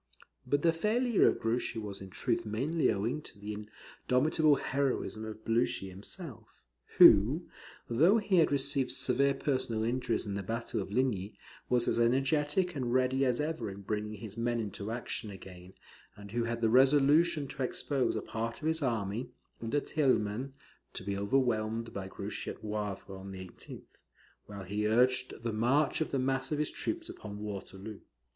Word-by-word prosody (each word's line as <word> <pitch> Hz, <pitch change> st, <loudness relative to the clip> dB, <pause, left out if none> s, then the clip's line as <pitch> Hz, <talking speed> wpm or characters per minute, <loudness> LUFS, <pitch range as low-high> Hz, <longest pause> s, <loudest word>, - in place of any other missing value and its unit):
But 145 Hz, +2 st, +1 dB
the 165 Hz, -1 st, +4 dB
failure 220 Hz, +6 st, +3 dB
of -, -, +2 dB
Grouchy 115 Hz, +1 st, -1 dB
was 105 Hz, -3 st, -5 dB
in 95 Hz, -, -8 dB
truth 115 Hz, +3 st, -1 dB
mainly 135 Hz, +10 st, +1 dB
owing 115 Hz, +9 st, -1 dB
to 115 Hz, -, -12 dB
the 105 Hz, +1 st, -5 dB
indomitable 130 Hz, +8 st, +1 dB
heroism 135 Hz, -5 st, -1 dB
of 110 Hz, 0 st, -8 dB
Blucher 115 Hz, -3 st, +1 dB
himself; 110 Hz, -, -7 dB, 0.5 s
who, 125 Hz, -, +7 dB, 0.4 s
though 165 Hz, -, +5 dB
he 205 Hz, -3 st, +1 dB
had 165 Hz, -, +5 dB
received 140 Hz, -1 st, +1 dB
severe 135 Hz, +2 st, +2 dB
personal 130 Hz, -6 st, -1 dB
injuries 120 Hz, 0 st, 0 dB
in 100 Hz, -, -3 dB
the 100 Hz, -, -2 dB
battle 115 Hz, +2 st, -3 dB
of 95 Hz, -, -6 dB
Ligny, 110 Hz, -4 st, 0 dB, 0.3 s
was 125 Hz, -1 st, +2 dB
as -, -, +1 dB
energetic 145 Hz, +8 st, +2 dB
and 125 Hz, -4 st, -2 dB
ready 130 Hz, +1 st, +2 dB
as 125 Hz, -2 st, +1 dB
ever 150 Hz, -7 st, -2 dB
in 100 Hz, +1 st, -8 dB
bringing 105 Hz, +1 st, -3 dB
his 105 Hz, -1 st, -9 dB
men 120 Hz, 0 st, 0 dB
into 105 Hz, -1 st, -4 dB
action 115 Hz, -2 st, -4 dB
again, 95 Hz, -2 st, -11 dB, 0.4 s
and 100 Hz, -1 st, -11 dB
who 120 Hz, +1 st, 0 dB
had 115 Hz, 0 st, -3 dB
the 115 Hz, -, +3 dB
resolution 145 Hz, +4 st, +5 dB
to 135 Hz, -, -6 dB
expose 130 Hz, +1 st, 0 dB
a -, -, -2 dB
part 115 Hz, +1 st, -4 dB
of 155 Hz, -, -3 dB
his 160 Hz, 0 st, +1 dB
army, 115 Hz, -3 st, -1 dB, 0.3 s
under 115 Hz, +6 st, 0 dB
Thielman, 130 Hz, -4 st, 0 dB, 0.4 s
to -, -, -5 dB
be 100 Hz, +1 st, -2 dB
overwhelmed 115 Hz, 0 st, 0 dB
by 95 Hz, -1 st, -5 dB
Grouchy -, -, -5 dB
at -, -, -8 dB
Wavre 105 Hz, -2 st, -4 dB
on 95 Hz, +1 st, -9 dB
the 95 Hz, -1 st, -7 dB
18th, -, -, -10 dB, 0.6 s
while 100 Hz, -1 st, -7 dB
he 105 Hz, +3 st, -1 dB
urged 125 Hz, +2 st, +2 dB
the 115 Hz, -2 st, -1 dB
march 135 Hz, +9 st, +2 dB
of 160 Hz, -, 0 dB
the 140 Hz, -, -1 dB
mass 135 Hz, +1 st, -1 dB
of 150 Hz, -, +1 dB
his 150 Hz, 0 st, 0 dB
troops 330 Hz, 0 st, -2 dB
upon 105 Hz, -1 st, -8 dB
Waterloo. 100 Hz, 0 st, -7 dB
120 Hz, 170 wpm, -31 LUFS, 105-140 Hz, 0.6 s, who